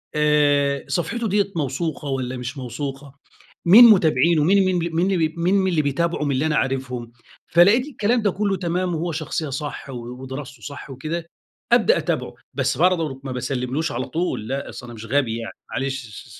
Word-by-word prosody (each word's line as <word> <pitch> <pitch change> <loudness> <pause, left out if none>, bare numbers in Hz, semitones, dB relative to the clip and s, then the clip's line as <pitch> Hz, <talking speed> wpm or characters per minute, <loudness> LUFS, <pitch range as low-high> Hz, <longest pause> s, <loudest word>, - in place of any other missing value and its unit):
آآ 145 -2 +2
صفحِته 230 +7 -1
ديّة 200 0 +1
موثوقة 150 0 -2
والّا 130 -1 -2
مش 125 +3 -6
موثوقة؟ 135 +2 -6 0.5
مين 210 +8 +10
متابعينه 165 - +5
مين 195 +4 +4
مين 185 -1 +1
ب - - -2
مين 180 +4 +2
ال 160 0 +1
مين 190 +2 +2
اللي 170 -4 +2
بيتابعوا 150 +2 -1
من 145 - 0
اللي 135 +3 0
أنا 155 -1 +1
عارفهم؟ 125 -3 -2 0.4
فلقيت 200 +9 +5
الكلام 240 -4 0
ده 205 -2 +2
كُلّه 200 0 -1
تمام 175 0 -1
وهو 170 +2 -2
شخصية 155 0 -3
صح 140 +1 -5
و 135 - -6 0.3
ودراسته 135 +1 -8
صح 145 -1 -8
وكده، 155 +6 -4 0.5
أبدأ - - +5
أتابعه. - - -2 0.2
بس - - 0
برضه 165 -6 +1
ما 135 - -5
باسلّملوش 130 +4 -2
على 125 +2 -3
طول 165 -10 -2
لأ. 135 +3 -3
أصل 125 - -9
أنا 120 - -9
مش 110 0 -9
غبي 125 -3 0
يعني 115 - -6 0.2
معلش 135 -1 -3 0.2
س - - -14
150 Hz, 180 wpm, -22 LUFS, 135-175 Hz, 0.5 s, مين